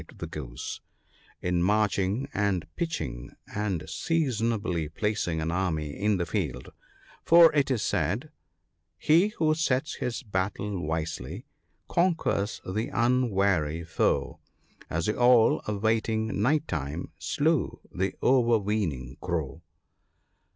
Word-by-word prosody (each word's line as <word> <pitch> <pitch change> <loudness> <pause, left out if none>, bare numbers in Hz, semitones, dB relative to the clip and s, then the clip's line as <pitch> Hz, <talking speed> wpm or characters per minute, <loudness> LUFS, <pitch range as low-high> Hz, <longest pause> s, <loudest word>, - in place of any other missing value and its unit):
129 - - -15
the 75 -5 -6
Goose, - - -6 0.6
'in 90 -1 +1
marching 105 +4 +1
and 95 -5 0
pitching, 110 - -4 0.2
and 95 -6 -2
seasonably 110 - -1
placing 90 -2 -1
an 80 +1 -1
army 85 -5 -1
in 105 +1 +1
the 85 - -1
field; 75 - -3 0.5
for 170 -1 +7
it 145 -2 +2
is 125 -5 0
said, 105 - -1 0.2
— 90 +4 -50
" 85 +1 -51
He 165 - +4
who 155 -1 +3
sets 155 -2 0
his 120 +2 -3
battle 100 -1 -2
wisely, 80 -4 -4 0.4
conquers 165 - 0
the 110 +6 -1
unwary 100 - +1
foe; 80 - 0 0.5
As 85 0 -1
the 105 +3 -1
Owl, 120 -2 +5
awaiting 110 0 0
night 150 +7 +2
time, 75 +2 -4
slew 155 -1 0
the 95 +1 -1
overweening 105 - +1
Crow." 85 -3 -3
100 Hz, 120 wpm, -27 LUFS, 85-120 Hz, 0.6 s, for